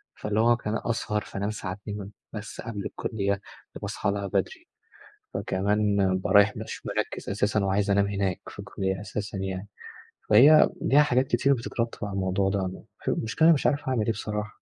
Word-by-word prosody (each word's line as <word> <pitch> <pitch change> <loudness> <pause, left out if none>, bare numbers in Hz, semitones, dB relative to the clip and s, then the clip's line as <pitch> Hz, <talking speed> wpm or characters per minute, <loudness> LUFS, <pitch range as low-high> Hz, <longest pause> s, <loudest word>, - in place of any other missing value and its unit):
فاللي 105 0 -2
هو 120 +1 +4
ك 120 - -8
أسهر 105 -1 -1
فانام 100 0 -4
ساعتين 100 0 -6 0.2
بس 110 0 -7
قبل 105 -4 -5
الكُلّية 100 -3 -2 0.3
فباصحى 100 - -2
لها 100 0 -3
بدري، - - -2 0.7
فكمان 100 +2 0
بابقى 95 +1 +1
رايح 100 +1 +6
مش - - -7
مركّز - - -3
أساسًا 100 0 +1
وعايز 100 +1 +1
أنام 100 0 +3
هناك 100 -3 -1
في - - -10
الكُلّية 95 -1 -3
أساسًا 100 -1 -5
يعني، 95 +1 -4 0.6
فهي 140 +9 +8
ليها 145 +2 +5
حاجات 130 -2 +2
كتير 135 +3 +3
بتترتّب 115 -2 -3
على 100 - -6
الموضوع 95 0 +1
ده، 95 -1 0
م 90 - -8 0.2
المشكلة 150 +9 +2
أنا 170 - +8
مش 140 - +1
عارف 145 -1 0
أعمل 120 -5 +1
إيه 115 - +2
بصراحة؟ 105 -1 -4
105 Hz, 165 wpm, -27 LUFS, 100-110 Hz, 0.7 s, فهي